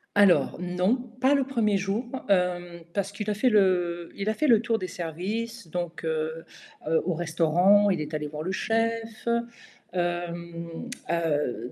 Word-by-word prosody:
Alors 200 -3 +5
non, 180 +5 +1 0.3
pas 265 +3 +5
le 275 - +3
1er 230 -6 +1
jour, 195 +5 -1 0.2
hem, 175 -2 +1
parce 200 -1 -1
qu'il 210 +1 -4
a - - +2
fait 250 +5 +3
le 180 -5 +2
il 200 +2 -2
a - - +2
fait 305 +6 0
le 230 -4 +6
tour 230 -2 0
des 185 - -3
services, 190 +7 -4
donc 175 -1 -4
heu, 160 0 -2 0.6
au 180 - +1
restaurant, 175 +5 +4
il 175 -4 0
est 150 +1 -6
allé 150 -1 -2
voir 150 +1 -6
le 185 - -2
chef. 225 +2 -1 0.7
Hem, 170 +1 -3 0.2
heu, 145 -8 -1
180 Hz, 160 wpm, -27 LUFS, 170-215 Hz, 0.7 s, le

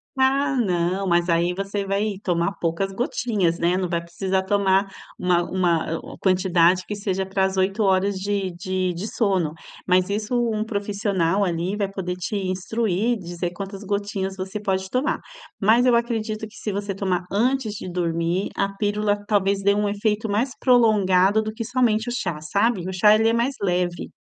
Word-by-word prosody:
Ah, 270 +1 +2
não, 185 -3 0
mas 175 0 +2
aí 170 +1 +1
você 195 +1 -3
vai 200 +2 0
tomar 170 0 +1
poucas 170 +4 -1
gotinhas, 200 -6 0
né, 175 +2 +1
não 185 -1 -1
vai 170 -1 0
precisar 190 +3 -2
tomar 195 0 +2 0.3
uma 180 -1 +2
uma 170 -3 0 0.2
a - - -12
quantidade 185 -1 +3
que 210 - -4
seja 195 -2 -2
pra 190 0 +1
às 190 0 -2
8 195 +3 +1
horas 195 0 +2
de 200 -1 -1
de 185 +1 -2
de 185 +6 -5
sono. 190 -10 0 0.3
Mas 185 +1 +3
isso 210 +4 -2 0.2
um 215 0 -1
profissional, 200 -3 0
ali, 175 +2 -1
vai 200 -2 -1
poder 185 -2 -4
te 180 +3 -4
instruir, 200 +4 -1
dizer 175 -1 -4
quantas 195 +2 -7
gotinhas 200 -1 -2
você 190 +2 -5
pode 190 -1 -1
tomar. 290 +6 0 0.4
Mas 225 +4 +4
eu 240 - +5
acredito 220 -2 -1
que - - -18
se 210 - -3
você 200 0 -3
tomar 185 -2 -1
antes 240 +1 +1
de 190 - -6
dormir, 170 +1 -1
a 195 0 0
pílula, 205 0 +1
talvez 200 -1 +1
dê 200 +1 +4
um 205 0 0
efeito 210 +1 -1
mais 230 +6 0
prolongado 210 -5 +4
do 215 - -4
que 225 +1 -5
somente 240 -2 +1
o - - -1
chá, 175 -9 -3
sabe. 200 +3 0
O 190 - -4
chá 210 +3 +6
ele 225 +1 +3
é - - +1
mais 240 +4 0
leve. 180 -2 -1
195 Hz, 180 wpm, -23 LUFS, 180-215 Hz, 0.4 s, chá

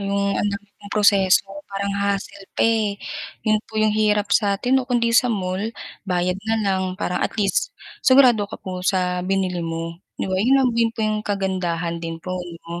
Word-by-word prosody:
'yong 200 0 0
ang 205 - +1
dami 200 0 -5
pong 205 0 -10
proseso. 200 -2 +4 0.2
Parang 200 0 -2
hassle 200 -1 -2
pa - - -1
eh, 220 -3 +2 0.5
'yon 215 -1 +3
po 220 - -9
'yong 215 -1 +3
hirap 210 -1 +2
sa 200 -2 +3
atin, 260 +4 +2
'no? - - -5
Kundi 235 -1 +2
sa 250 - +4
mall, 190 +2 -2 0.4
bayad 180 0 +1
na 225 0 +1
lang 190 -2 +1 0.2
parang 180 - -1
at - - -1
least, - - +1 0.3
sigurado 255 -5 +6
ka - - -7
po 185 -1 -5
sa 180 -2 +1
binili 185 -2 0
mo, 165 0 -4 0.2
'di - - -2
ba? 185 - 0
Yun 255 +5 +4
lang 255 -2 +3
din 230 -1 +3
po 230 - -26
'yong 215 0 0
kagandahan 180 -4 -1
din 165 0 -4
po, 185 +2 -4
'no. 170 0 -8
200 Hz, 195 wpm, -22 LUFS, 185-215 Hz, 0.5 s, sigurado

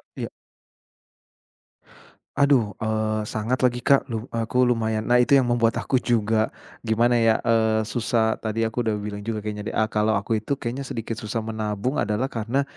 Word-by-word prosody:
E - - -7
iya. - - -4 2.1
Aduh, 135 -7 +4
eee, 110 -1 -1
sangat 115 +5 -2
lagi 125 -1 +1
Kak, 140 +1 +4
lu 115 -4 -4
aku 115 +2 +1
lumayan 110 -3 +1
nah 125 +2 +3
itu 130 +4 +4
yang 135 - +5
membuat 115 -1 +2
aku 130 - 0
juga, 110 -2 +1 0.3
gimana 120 +1 +2
ya? 115 -1 +3
Eee, 110 -1 +2
susah 110 0 0
tadi 110 +1 -2
aku 115 +2 -2
udah 110 - +1
bilang 105 0 -5
juga 105 0 -4
kayaknya 105 0 -5
deh, - - -4
a 110 - +3
kalau 110 +1 +2
aku 105 +2 0
itu 125 +6 -2
kayaknya 130 +1 -5
sedikit 115 -1 -4
susah 110 +1 -3
menabung 110 +3 -2
adalah 110 +6 -1
karena, 120 +5 -1
115 Hz, 175 wpm, -24 LUFS, 110-120 Hz, 2.1 s, yang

